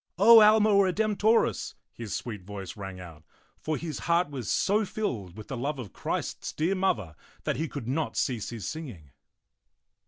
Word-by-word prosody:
O 225 +4 +9
Alma 215 0 +6
Redemptorisy 205 - +2 0.2
his 115 -4 -5
sweet 110 -5 -5
voice 100 -1 -7
rang 95 -2 -7
out; 80 -4 -11 0.4
for 155 -1 -2
his 160 -4 -5
heart 170 -2 +3
was 130 -6 -5
so 210 +3 +2
filled 115 - -4
with 110 - -9
the 135 - -4
love 140 +4 -2
of 115 -7 -8
Christ's - - -4
dear 165 +5 0
Mother 115 - -1 0.3
that - - -1
he 160 - -1
could 140 -6 -7
not 150 +5 -2
cease 120 -6 -1
his 115 -5 -6
singing. 115 - -7
140 Hz, 165 wpm, -28 LUFS, -, 0.4 s, O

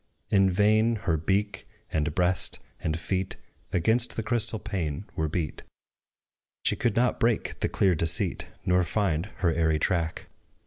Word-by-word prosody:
In 95 -1 +4
vain 110 +4 +3
her 85 -4 +2
beak, 95 +5 -1 0.3
and 75 -1 -1
breast, 90 +1 +1 0.2
and 80 0 -2
feet 95 +2 -2 0.4
Against 110 +8 +2
the 115 - -3
crystal 110 0 +5
pane 95 -6 -4
were 80 - -1
beat: 80 -1 -3 1.0
She - - +3
could 120 -4 -1
not 125 +1 +1
break 115 -1 0
the - - 0
clear 95 -2 +2
deceit, 85 +1 +1 0.2
Nor 90 0 +3
find 90 -2 -1 0.2
her 85 - +3
airy 80 -1 +1
track. 85 -1 -1
95 Hz, 145 wpm, -27 LUFS, 80-105 Hz, 1.0 s, crystal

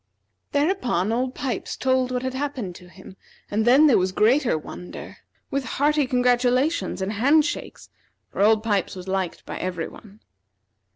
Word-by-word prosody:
Thereupon, 285 - +1
Old 250 +3 -1
Pipes 265 -3 -4
told 260 -1 +1
what 250 0 -2
had 260 0 -2
happened 260 -8 -4
to 180 +1 -14
him, 190 +1 -14 0.4
and 215 +2 +1
then 265 +6 +6
there 275 -9 +5
was 185 0 0
greater 235 - +3
wonder, 180 +3 -9 0.3
with 275 -1 -1
hearty 295 0 +2
congratulations 250 - +1
and 200 +3 -2
hand 285 +8 +4
shakes; 340 - -5 0.4
for - - -3
Old 215 +1 +4
Pipes 205 -4 0
was 185 0 -9
liked 190 -2 -3
by - - -6
every 180 -3 -3
one. 210 0 -15
245 Hz, 160 wpm, -24 LUFS, 195-270 Hz, 0.4 s, then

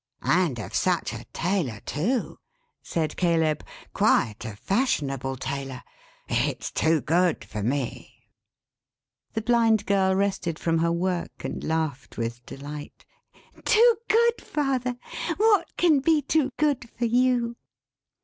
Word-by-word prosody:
"And 170 -8 +2
of 105 -5 -7
such - - +1
a - - -7
tailor, 170 - -2
too," 220 - -1 0.4
said 160 -2 -2
Caleb. 160 -4 +2 0.3
"Quite 105 -1 +2
a 110 - -6
fashionable 135 - -1
tailor. 135 0 -5 0.4
It's - - -1
too 160 -1 +2
good 170 +1 +1
for 105 - -5
me." 125 +3 -4 1.0
The 220 - -2
Blind 225 -2 +3
Girl 190 -1 +2
rested 190 -4 0
from 165 -1 0
her 170 +1 +2
work, 175 +1 -2
and - - -4
laughed 160 -4 -2
with 115 +1 -3
delight. 145 +2 -9 0.6
"Too 465 +1 +5
good, 470 +1 +3
father! 260 -4 -1 0.4
What 410 -5 +3
can 325 -5 +4
be 305 +1 +3
too 285 0 +2
good 285 -6 +1
for 240 - 0
you?" 240 0 +2
180 Hz, 125 wpm, -26 LUFS, -, 1.0 s, Too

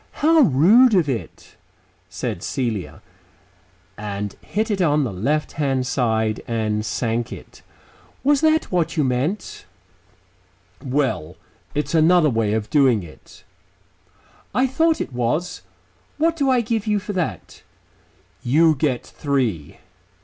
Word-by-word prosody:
"How 320 +2 +3
rude 215 - +5
of 175 -5 +3
it," 125 -5 -6 0.5
said - - -4
Celia, 115 -8 -4 1.0
and 105 -1 -4
hit 220 +2 -2
it 195 -2 0
on 150 -3 +2
the 115 -7 -3
left 145 +12 -1
hand 135 -3 -1
side, 110 -4 0
and 110 -2 -1
sank 115 +2 -2
it. - - -11 0.6
"Was 285 +1 +3
that 315 0 +2
what 170 -2 0
you 150 - +3
meant?" 135 +10 -2 1.2
"Well... 130 - -1 0.4
it's 150 +1 -2
another 160 -1 +4
way 110 -2 0
of 110 -1 -3
doing 130 -9 +3
it." 80 -3 -15 1.1
"I 255 - +3
thought 320 +5 +1
it - - -5
was. 125 +8 -2 0.6
What 325 +2 +1
do 280 -4 0
I 255 -2 +3
give 225 -1 -2
you 210 -1 +2
for 205 +1 -5
that?" 180 -4 -4 0.8
"You 160 +6 +4
get 135 -4 -1
three." 120 - -2
145 Hz, 130 wpm, -21 LUFS, -, 1.2 s, rude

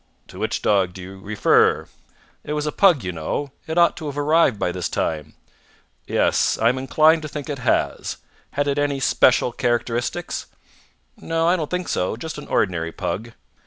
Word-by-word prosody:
"To - - -11
which - - -2
dog 95 -4 +2
do 95 - -9
you 95 +1 -10
refer?" 100 +1 +2 0.6
"It 150 - -4
was 150 0 -1
a 150 - -1
pug, 175 - +4
you 90 - -2
know. 90 - -3 0.2
It 160 +1 -3
ought 170 0 +5
to 160 -3 -5
have 145 0 -5
arrived 145 -5 +3
by 90 - -1
this 90 0 -3
time." 75 -2 -3 0.7
"Yes. - - +2
I 115 - +3
am 130 +2 -1
inclined 155 +4 +4
to 155 - -5
think 150 0 -7
it 140 - -5
has. 125 - 0 0.3
Had 145 0 -1
it 140 0 0
any 145 -1 0
special 125 -2 +3
characteristics?" 120 0 -2 0.7
"No, 165 0 -1
I 175 - +4
don't 155 -5 -3
think 180 -1 -2
so. 90 +4 -1
Just 155 +6 -6
an - - -10
ordinary 85 -4 0
pug." 115 +7 -4
135 Hz, 185 wpm, -22 LUFS, 100-155 Hz, 0.7 s, ought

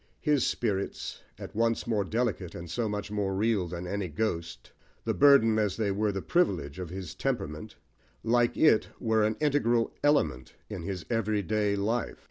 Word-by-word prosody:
His 150 -4 +2
"spirits," 100 -4 -2 0.2
at 95 - -9
once 115 +1 +1
more 110 -4 +1
delicate, 105 -5 -2
and 85 - -7
so 115 +3 -1
much 105 0 -4
more 100 -2 -1
real, 105 -3 +1
than 85 +1 -6
any 100 +1 -2
ghost 85 -1 -3 0.3
the - - +1
burden, 135 -6 +5
as 105 -3 0
they 105 -3 0
were 105 +1 0
the 95 -1 -4
privilege, 90 - 0
of 90 -3 -5
his 95 -2 -6
temperament 75 +8 -3 0.5
like 120 +1 +2
it, 155 -9 +4
were 110 -2 +2
an 105 +1 +1
integral 125 -6 +2
element 145 - +1 0.2
in - - -4
his 90 0 -5
everyday 105 -2 0
life. 110 +4 -1
105 Hz, 165 wpm, -29 LUFS, 95-115 Hz, 0.5 s, burden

